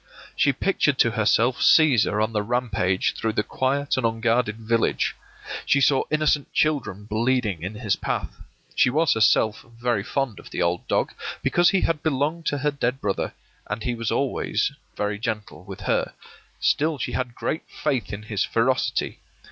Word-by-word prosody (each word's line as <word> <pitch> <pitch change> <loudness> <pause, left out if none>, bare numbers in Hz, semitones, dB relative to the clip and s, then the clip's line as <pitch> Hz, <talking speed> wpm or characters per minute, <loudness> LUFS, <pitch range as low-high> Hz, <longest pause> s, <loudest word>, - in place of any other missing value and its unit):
She - - +3
pictured - - +1
to - - +4
herself 120 +3 +2
Cæsar 120 -9 +4
on 110 +1 -2
the 105 - +1
rampage 105 -5 0
through 110 -1 -2
the 105 - +1
quiet 140 +4 -1
and 130 - 0
unguarded 115 0 +1
village. 115 0 0 0.5
She 140 - +3
saw 135 0 +3
innocent 155 -1 +1
children 140 -10 0
bleeding 110 -4 0
in 95 +5 -5
his 105 -2 0
path. - - -4 0.3
She - - +4
was 155 +4 +3
herself 110 -1 +3 0.2
very 120 -4 +1
fond 130 -1 -2
of - - -12
the - - -5
old 85 +1 0
dog, - - 0 0.3
because 175 0 +4
he 190 +1 +2
had 165 -3 0
belonged 155 +2 -1
to 145 - +1
her 150 +2 0
dead 135 -2 -1
brother, 100 -5 -2 0.4
and 105 +1 -3
he 125 - -1
was 115 -1 -3
always 135 -1 0 0.3
very 105 0 -1
gentle 110 -2 -4
with - - -9
her; - - 0 0.5
still 155 +1 +1
she 120 - -3
had 125 -2 -3
great 160 - -2
faith 125 -10 -2
in 100 +1 -6
his 105 -2 -1
ferocity. 130 +3 0
120 Hz, 170 wpm, -24 LUFS, 110-140 Hz, 0.5 s, to